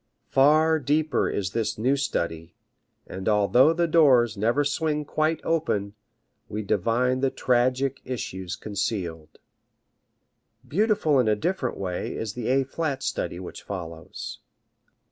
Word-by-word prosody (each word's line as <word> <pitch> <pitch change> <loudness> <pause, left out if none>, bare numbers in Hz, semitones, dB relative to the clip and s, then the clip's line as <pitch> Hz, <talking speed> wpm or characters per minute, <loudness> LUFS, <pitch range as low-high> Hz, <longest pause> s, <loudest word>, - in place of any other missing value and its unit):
Far 155 +4 +4
deeper 150 +2 +1
is 95 -2 -2
this 115 0 -2
new 130 +6 +2
study, 85 -11 -3 0.5
and 95 +3 -4
although 110 +8 +5
the 170 +1 +1
doors 130 -9 +4
never 115 +8 +1
swing 150 +1 -1
quite 155 +2 0
open, 105 -12 -1 0.6
we 105 +1 -4
divine 115 +6 +1
the 135 0 +2
tragic 130 +2 +1
issues 95 -7 -5
concealed. 95 -7 -4 1.3
Beautiful 175 - +2
in 125 - +2
a 105 - +3
different 155 - -2
way 90 -2 -3
is 110 -2 -4
the 120 -1 -5
A 135 +2 +3
flat 140 -1 -3
study 85 - -3
which 90 - -8
follows. 85 -4 -7
125 Hz, 125 wpm, -25 LUFS, 100-150 Hz, 1.3 s, although